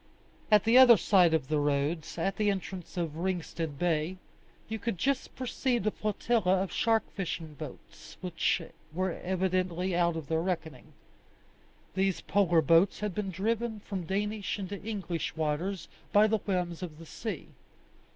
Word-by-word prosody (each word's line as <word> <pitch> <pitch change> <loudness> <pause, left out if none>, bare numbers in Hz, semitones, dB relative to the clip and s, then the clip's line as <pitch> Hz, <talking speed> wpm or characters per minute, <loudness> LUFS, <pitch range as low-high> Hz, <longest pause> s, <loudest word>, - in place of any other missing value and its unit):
At 210 -2 +6
the 230 +3 +6
other 245 -3 +9
side 180 -2 +4
of 160 -5 +1
the 150 0 +1
roads, 145 +3 -1
at 195 +4 -1
the 210 -1 +2
entrance 190 -2 -4
of 165 -3 -2
Ringstead 170 -4 -3
Bay, 170 +1 0 0.5
you 220 0 -4
could 230 -2 -2
just 270 +8 -1
perceive 250 -3 -1
a 215 - +2
flotilla 205 -3 +1
of 195 - -5
shark 225 -1 +2
fishing 165 -5 -4
boats, 155 +1 -10
which 180 -1 0 0.3
were 185 +3 -1
evidently 185 0 -1
out 170 -1 +2
of 160 -3 -5
their 160 +1 +1
reckoning. 160 -7 -4 1.0
These 190 -1 +1
polar 175 -5 +3
boats 165 +8 +4
had 210 -2 -2
been 205 0 -2
driven 220 +4 -1
from 190 -5 -5
Danish 205 +2 -1
into 200 0 -5
English 190 -8 -3
waters 160 +5 -2 0.2
by 205 +1 +6
the 215 0 +2
whims 180 -3 -2
of 165 -4 -6
the 165 - -11
sea. - - -6
185 Hz, 155 wpm, -30 LUFS, 165-205 Hz, 1.0 s, other